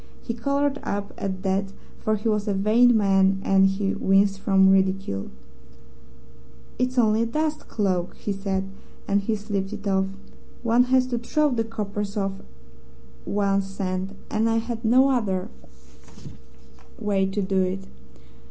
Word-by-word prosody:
He 230 - -3
coloured 280 +4 0
up 200 0 -4
at 190 -1 -4
that, 195 0 -1 0.3
for 215 - 0
he 215 +2 -3
was 210 -1 0
a 200 - 0
vain 225 +4 +4
man, 195 -2 +3
and 195 0 +5
he 195 0 -1
winced 195 0 +2
from 190 -1 +4
ridicule. 190 - 0 1.5
"'It's 255 +1 -1
only 220 -2 +3
a 230 - +1
dust 305 +4 -2
cloak,' 185 -5 -1
said 195 -1 -2
he, 195 - -10 0.4
and 200 0 +2
he 215 +2 -1
slipped 205 -1 -3
it 205 -1 -6
off. 190 -1 +2 0.6
'One 235 +1 +4
has 255 0 +3
to 245 -2 -2
throw 300 +5 +1
the 230 -2 0
coppers 210 -2 -4
off 195 -1 -1 0.9
one's 195 -1 0
scent, 190 0 -3 0.2
and 220 +1 +1
I 225 - +2
had 230 0 -4
no 255 +4 +5
other 195 -7 -1 1.5
way 195 -2 0
to 195 +2 -2
do 190 0 +1
it.' 185 +1 -2
200 Hz, 150 wpm, -24 LUFS, 195-230 Hz, 1.5 s, and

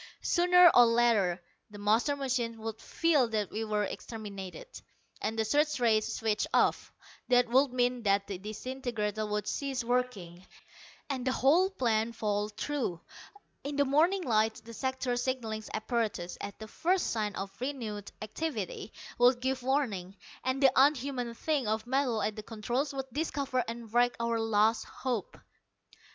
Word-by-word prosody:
Sooner 360 0 +6
or 245 -1 +8
later 230 -6 +3 0.3
the 205 - -11
master 220 +8 +2
machine 250 -4 -2
would 220 0 -6
feel 310 -7 +2
that 215 -3 -2
we 220 - -3
were 210 -1 0
exterminated, 205 - -7 0.6
and 220 - -2
the 220 - +1
search 295 +5 +2
rays 220 -3 +2
switched 220 -2 0
off. - - +2 0.4
That 245 -1 +4
would 265 +2 +4
mean 250 0 +1
that 200 -2 +2
the 195 -3 -6
disintegrator 215 0 -3
would 210 -1 -2
cease 270 +1 -2
working, 230 -8 -2 0.6
and 265 -3 -3
the - - +3
whole 315 +9 +4
plan 235 - 0
fall 210 -1 -1
through. 220 -4 -3 0.6
In 285 +1 -4
the 285 0 +3
morning 335 +8 +3
light, 220 -4 +2
the 230 - -10
sector 260 0 -2
signalling 240 -4 -2
apparatus, 220 -6 -2
at 200 - -6
the 220 - -9
first 355 - 0
sign 210 -3 -2
of 195 0 -5
renewed 230 -7 -4
activity, 220 - -4 0.3
would 245 +1 +5
give 260 +1 -1
warning, 220 -9 -1 0.3
and 260 +2 -1
the 265 - +7
unhuman 265 -3 +2
thing 290 -3 -1
of 215 0 -1
metal 250 -3 0
at 215 - -1
the 215 - -6
controls 240 +6 -2
would 270 -1 -4
discover 280 -4 -1
and 230 -1 -7
wreck 245 0 +3
our 230 0 0
last 225 0 +2
hope. 245 -7 -4
235 Hz, 155 wpm, -30 LUFS, 215-265 Hz, 0.6 s, or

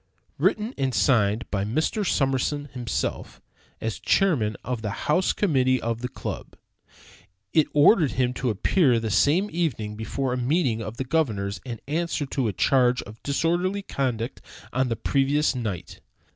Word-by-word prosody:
Written 215 +4 +1
and 130 -3 0
signed 110 -3 +2
by 100 -2 0
Mr. 155 - 0
Summerson 145 -2 0
himself, 120 -4 -3 0.4
as 110 -1 -3
chairman 130 - +2
of 125 -1 -3
the 110 - -3 0.2
house 175 +5 +3
committee 130 -9 +2
of 115 0 -3
the 125 - -2
club, - - -7 1.0
it 155 -2 +4
ordered 150 - +5
him 125 -1 +1
to 125 0 -2
appear 125 - +3
that 110 -1 -3
same 165 - +3
evening 120 -11 -1
before 125 +4 -2
a - - -1
meeting 125 -3 +1
of 110 +2 -6
the 130 - -1
governors 110 -10 -1
and 115 -3 -5
answer 160 0 -1
to 135 -3 -1
a - - 0
charge 125 +3 +3
of 110 +2 -13
disorderly 175 +7 0
conduct 125 - -2 0.3
on 130 0 +1
the 115 - 0
previous 140 +6 +1
night. 110 -8 -5
130 Hz, 155 wpm, -25 LUFS, 115-150 Hz, 1.0 s, ordered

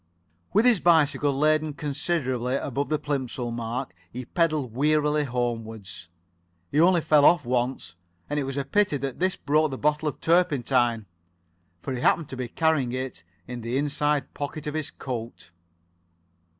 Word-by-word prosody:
With 215 +5 +3
his 240 -6 +5
bicycle 150 -4 +3
laden 155 +2 +2
considerably 135 -4 -1
above 140 0 -2
the 155 - +1
Plimsoll 130 -5 -3
mark, 115 -4 -4 0.2
he 125 +1 -6
pedalled 155 -8 0
wearily 150 +2 +2
homewards. 115 - -4 0.6
He 150 - +3
only 175 0 +5
fell 150 -2 +4
off 160 -2 +5
once, 120 -7 -1 0.3
and 145 0 -1
it 140 - -1
was 135 +1 -4
a 140 - -1
pity 190 0 +2
that 135 -1 -5
this 185 +1 +1
broke 155 +2 +1
the 135 - -5
bottle 150 +2 0
of - - -9
turpentine, 130 - +2 0.8
for 135 - -3
he 125 - -4
happened 160 +2 +2
to - - -5
be 125 -1 -4
carrying 140 -2 +1
it 130 -8 -4 0.3
in 125 0 -6
the 115 +3 -2
inside 145 -1 0
pocket 145 +1 -5
of 150 - -3
his 155 -2 -2
coat. 115 -8 -7
140 Hz, 160 wpm, -26 LUFS, 125-155 Hz, 0.8 s, his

